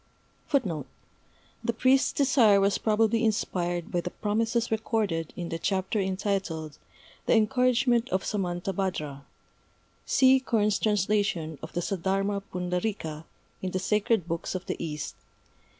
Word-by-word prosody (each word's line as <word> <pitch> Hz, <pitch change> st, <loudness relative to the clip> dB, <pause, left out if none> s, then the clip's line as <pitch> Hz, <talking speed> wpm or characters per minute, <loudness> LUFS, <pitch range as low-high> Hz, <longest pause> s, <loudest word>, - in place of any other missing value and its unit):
The 230 Hz, -, -4 dB
priest's 265 Hz, +2 st, +4 dB
desire 255 Hz, -8 st, +4 dB
was 195 Hz, -1 st, +2 dB
probably 225 Hz, +1 st, +2 dB
inspired 175 Hz, -5 st, -1 dB
by 175 Hz, -, 0 dB
the 180 Hz, -, -4 dB
promises 225 Hz, +4 st, -1 dB
recorded 210 Hz, -7 st, -1 dB
in 175 Hz, -2 st, -4 dB
the 165 Hz, -1 st, -3 dB
chapter 190 Hz, +3 st, 0 dB
entitled 190 Hz, -5 st, -2 dB, 0.5 s
"The -, -, +5 dB
Encouragement 250 Hz, +1 st, +3 dB
of 190 Hz, +1 st, 0 dB
Samantabhadra" 180 Hz, -6 st, -2 dB, 0.8 s
(see 265 Hz, 0 st, +5 dB
Kern's 215 Hz, -5 st, +1 dB
translation 200 Hz, -7 st, 0 dB
of 160 Hz, -, -8 dB
the 175 Hz, -, -1 dB
Saddharma 195 Hz, +2 st, -1 dB
Pundarîka 180 Hz, -3 st, -3 dB, 0.4 s
in 185 Hz, -, -2 dB
the 185 Hz, -, -2 dB
Sacred 210 Hz, 0 st, +1 dB
Books 170 Hz, +2 st, -3 dB
of 185 Hz, -, -4 dB
the -, -, -4 dB
East, 150 Hz, -2 st, -4 dB
pp. -, -, -35 dB
195 Hz, 125 wpm, -27 LUFS, 175-225 Hz, 0.8 s, The